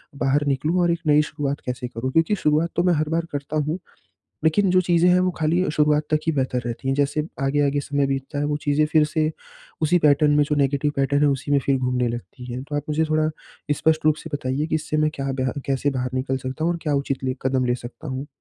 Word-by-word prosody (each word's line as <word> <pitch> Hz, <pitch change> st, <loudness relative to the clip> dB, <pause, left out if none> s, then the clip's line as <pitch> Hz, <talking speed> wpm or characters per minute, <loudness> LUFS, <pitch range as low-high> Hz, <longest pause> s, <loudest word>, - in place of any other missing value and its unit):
बाहर 140 Hz, +1 st, +1 dB
निकलूँ 155 Hz, +6 st, +1 dB
और 175 Hz, -1 st, +3 dB
एक 170 Hz, -, -1 dB
नई 150 Hz, 0 st, +5 dB
शुरुआत 145 Hz, -2 st, -3 dB
कैसे 125 Hz, 0 st, -3 dB
करूँ? 125 Hz, +2 st, -4 dB
क्योंकि 165 Hz, +6 st, +3 dB
शुरुआत 155 Hz, -1 st, +1 dB
तो 175 Hz, -, +2 dB
मैं 180 Hz, -1 st, +3 dB
हर 155 Hz, 0 st, 0 dB
बार 165 Hz, +1 st, 0 dB
करता 145 Hz, +1 st, -3 dB
हूँ, 155 Hz, +4 st, -2 dB, 0.7 s
लेकिन 185 Hz, +5 st, +3 dB
जो 185 Hz, 0 st, +5 dB
चीज़ें 175 Hz, -1 st, +3 dB
हैं, 180 Hz, -, +5 dB
वो 185 Hz, 0 st, +2 dB
खाली 165 Hz, +4 st, +2 dB
अ, -, -, -2 dB
शुरुआत 150 Hz, 0 st, +2 dB
तक 155 Hz, -, +3 dB
ही 160 Hz, -, +2 dB
बेहतर 130 Hz, -3 st, 0 dB
रहती 120 Hz, +3 st, -4 dB
हैं, 135 Hz, -, +2 dB
जैसे 145 Hz, +2 st, 0 dB, 0.2 s
आगे-आगे 145 Hz, +1 st, +1 dB
समय 140 Hz, 0 st, 0 dB
बीतता 135 Hz, +2 st, -3 dB
है, 145 Hz, -, 0 dB
वो 145 Hz, 0 st, 0 dB
चीज़ें 145 Hz, +1 st, +3 dB
फिर 155 Hz, -1 st, +5 dB
से 155 Hz, 0 st, 0 dB, 0.5 s
उसी 165 Hz, +3 st, +4 dB
पैटर्न 150 Hz, -1 st, +4 dB
में 150 Hz, -, +4 dB
जो 150 Hz, +1 st, -1 dB
नेगेटिव 140 Hz, +1 st, +1 dB
पैटर्न 140 Hz, +1 st, +1 dB
है, 150 Hz, -, +5 dB
उसी 135 Hz, +1 st, -2 dB
में 140 Hz, -, +5 dB
फिर 140 Hz, -, +3 dB
घूमने 125 Hz, -1 st, 0 dB
लगती 120 Hz, +1 st, -7 dB
है। 125 Hz, +2 st, -4 dB
तो 145 Hz, +1 st, -5 dB
आप 145 Hz, -, -1 dB
मुझे 155 Hz, +1 st, +1 dB
थोड़ा 155 Hz, 0 st, +2 dB, 0.5 s
स्पष्ट 160 Hz, +1 st, +1 dB
रूप 155 Hz, -, +5 dB
से 160 Hz, -, -9 dB
बताइए 140 Hz, +2 st, -1 dB
कि 160 Hz, -, -2 dB
इससे 155 Hz, 0 st, -1 dB
मैं 155 Hz, 0 st, +2 dB
क्या 135 Hz, 0 st, -3 dB
बेहा 130 Hz, -1 st, -1 dB
कैसे 140 Hz, +1 st, 0 dB
बाहर 125 Hz, -2 st, -2 dB
निकल 130 Hz, +1 st, -1 dB
सकता 130 Hz, +4 st, -4 dB
हूँ, 170 Hz, -, +2 dB
और 170 Hz, -, -4 dB
क्या 150 Hz, -3 st, 0 dB
उचित 140 Hz, -1 st, -2 dB
ले 130 Hz, -, 0 dB
कदम 130 Hz, -1 st, +1 dB
ले 120 Hz, -, +2 dB
सकता 125 Hz, +5 st, -9 dB
हूँ? 130 Hz, +2 st, -4 dB
145 Hz, 250 wpm, -23 LUFS, 135-155 Hz, 0.7 s, नई